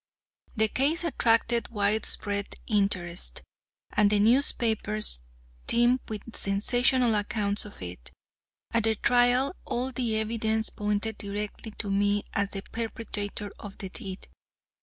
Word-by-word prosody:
The 220 0 +3
case 290 +9 +1
attracted 235 -6 +2
widespread 205 -1 0
interest, 195 -5 0 0.5
and 210 -1 +4
the 210 0 +3
newspapers 220 - +2 0.5
teemed 240 +2 +4
with 220 +1 -6
sensational 245 +4 +3
accounts 205 -1 -1
of 205 - -11
it. 85 -9 -8 0.6
At 230 -1 +1
the 220 0 +3
trial, 245 - +3
all 250 +2 -1
of - - -11
the 235 -3 0
evidence 220 0 0
pointed 210 +1 -1
directly 205 +2 -5
to 205 -3 -2
me 205 +1 +2
as 200 0 0
the 195 -1 -6
perpetrator 210 -3 -4
of 205 -2 -9
the 190 - -6
deed. 195 -2 -7
215 Hz, 125 wpm, -28 LUFS, 205-235 Hz, 0.6 s, and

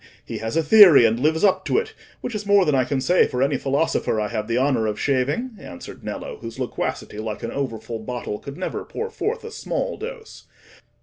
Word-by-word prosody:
He - - -5
has 110 +6 -3
a 165 - +3
theory, 175 - +8
and 115 +1 +2
lives 155 +5 +1
up 195 -2 +3
to - - +1
it, 455 - -1 0.3
which 240 - -4
is 210 -1 -3
more 200 -2 +5
than 150 - +2
I 130 -2 +3
can 140 0 -1
say 175 +7 +3
for 125 +1 0
any 140 +1 +1
philosopher 135 -4 0
I 105 - -1
have 105 0 -3
the 115 0 0
honour 130 -4 +2
of 105 -1 -3
shaving," 145 - 0
answered 85 - -10
Nello, - - -6
whose 115 0 -8
loquacity, 125 -4 -4
like 110 -1 -5
an 115 - -3
over 135 -5 -2
full 115 +1 -6
bottle, 115 -2 -5
could 140 +2 -9
never 185 - -4
pour 455 +1 -5
forth 450 +3 -3
a 455 - -7
small - - -3
dose. 460 0 -9
140 Hz, 225 wpm, -23 LUFS, -, 0.3 s, theory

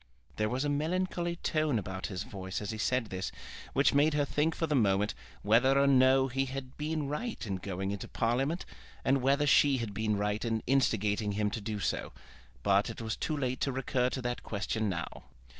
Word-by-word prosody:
There 105 0 +1
was 130 +3 -1
a - - +1
melancholy 170 +4 -1
tone 155 -6 0
about 95 -2 -4
his 95 0 -4
voice 95 -4 -5
as 105 0 -4
he 110 - -6
said 125 0 0
this, 95 0 -3 0.4
which 140 - +3
made 145 +2 +4
her 145 -1 +2
think 150 +3 0
for 165 - 0
the 155 - -1
moment 105 -5 +2 0.3
whether 125 +6 +4
or 140 - +5
no 130 0 +5
he 135 +1 0
had 130 0 -6
been 150 -1 -2
right 220 - -3
in 100 -3 -2
going 95 +1 -3
into 100 -1 -5
Parliament, 135 +9 0 0.4
and 135 0 +3
whether 140 +3 +3
she 140 -1 +5
had 115 -4 -4
been 105 0 0
right 105 +1 -1
in 115 -2 -1
instigating 105 -5 +1
him 105 0 0
to 110 - -4
do 105 0 -3
so. - - -2 0.5
But 100 0 +3
it - - -7
was 110 -1 -3
too 155 - -2
late 130 -2 -2
to 135 - +1
recur 125 -1 0
to 130 0 -4
that 120 0 -2
question 110 +1 -2
now. 85 -3 -5
125 Hz, 205 wpm, -31 LUFS, 105-140 Hz, 0.5 s, or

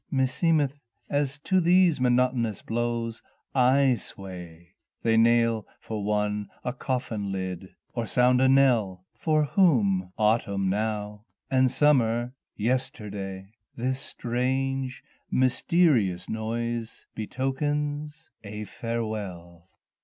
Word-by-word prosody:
Meeseemeth 145 +2 +1 0.3
as 145 0 0
to 185 +5 +1
these 175 -4 +4
monotonous 125 -4 +1
blows 115 0 -2 0.3
I 130 +1 +4
sway, 90 -5 -9 0.3
They 115 -1 +3
nail 115 -1 +3
for 110 -2 -5
one 105 0 -1
a 125 - -2
coffin 120 -6 -3
lid, 95 -1 -5 0.2
or 115 -2 -2
sound 125 +2 +3
a 130 - +5
knell 115 -9 +3
For 155 -2 +1
whom? 115 - +2
Autumn 100 -3 +1
now 105 0 -3 0.3
and 130 -1 +4
summer 120 -4 +2 0.2
yesterday! 105 -5 -3 0.2
This 130 +2 -1
strange 130 0 -2 0.3
mysterious 130 - +2
noise 115 +1 -3
betokens 145 +6 -3
a 105 0 -6
farewell. 100 -6 -5
120 Hz, 100 wpm, -26 LUFS, 105-135 Hz, 0.3 s, a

